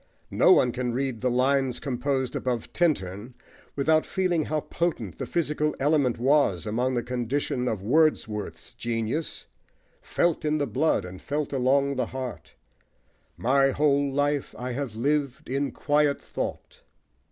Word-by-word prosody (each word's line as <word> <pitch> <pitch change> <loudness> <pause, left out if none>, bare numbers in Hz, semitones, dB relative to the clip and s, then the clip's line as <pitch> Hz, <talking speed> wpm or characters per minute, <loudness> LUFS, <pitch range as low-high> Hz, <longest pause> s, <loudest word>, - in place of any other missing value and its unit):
No - - +5
one 125 - +5
can 125 -1 -2
read 130 -2 -2
the 125 - +1
Lines 130 +1 +1
composed 130 -1 -2
above 125 -3 -2
Tintern 120 - -1 0.4
without 155 +3 +3
feeling 180 -5 0
how 155 0 -1
potent 130 - -3
the - - -3
physical 150 -2 0
element 140 -3 +2
was 125 - +2
among 125 +4 0
the 120 - 0
conditions 125 +1 -1
of 100 -4 -3
Wordsworth's 110 - 0
genius 115 +6 -3 0.6
"felt 170 -2 0
in 155 0 +1
the 145 - 0
blood 140 - +1
and 90 +1 -9
felt 145 0 -3
along 135 +1 +2
the 130 - 0
heart." 130 -2 -7 0.8
My 135 +3 +3
whole 140 0 +2
life 145 0 0
I 125 +1 -4
have 125 -3 -4
lived 140 +2 -1
in 135 +2 -1
quiet 145 -1 +1
thought! - - -6
135 Hz, 140 wpm, -26 LUFS, 120-145 Hz, 0.8 s, No